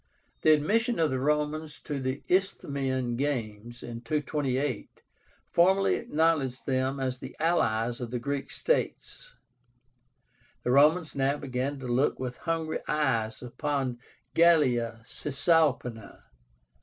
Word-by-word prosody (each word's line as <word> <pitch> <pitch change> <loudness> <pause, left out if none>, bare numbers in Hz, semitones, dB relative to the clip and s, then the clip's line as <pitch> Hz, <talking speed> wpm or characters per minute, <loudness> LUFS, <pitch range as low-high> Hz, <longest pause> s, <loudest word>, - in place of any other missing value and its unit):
The 155 - +5
admission 225 - +1
of 160 -3 +2
the 130 - -1
Romans 150 +2 -1
to 145 -3 -4
the 130 +1 -3
Isthmian 135 -9 0
Games 120 -4 -3
in 115 -1 -7
228 140 -2 -2 0.5
formally 190 +3 +4
acknowledged 150 -5 0
them 130 +1 0
as 130 -1 -2
the - - -9
allies 120 -8 +1
of 120 - -4
the 125 - -2
Greek 140 +3 -3
states." - - -2 1.3
The 125 - 0
Romans 155 +5 +4
now 140 +1 +1
began 135 0 -3
to 130 -2 -7
look 125 +4 +1
with 125 -1 -4
hungry 165 -1 -2
eyes 115 -8 0
upon 135 -1 -2 0.3
GALLIA 125 -9 +3
CISALPÍNA. 135 - 0
140 Hz, 120 wpm, -28 LUFS, 125-155 Hz, 1.3 s, The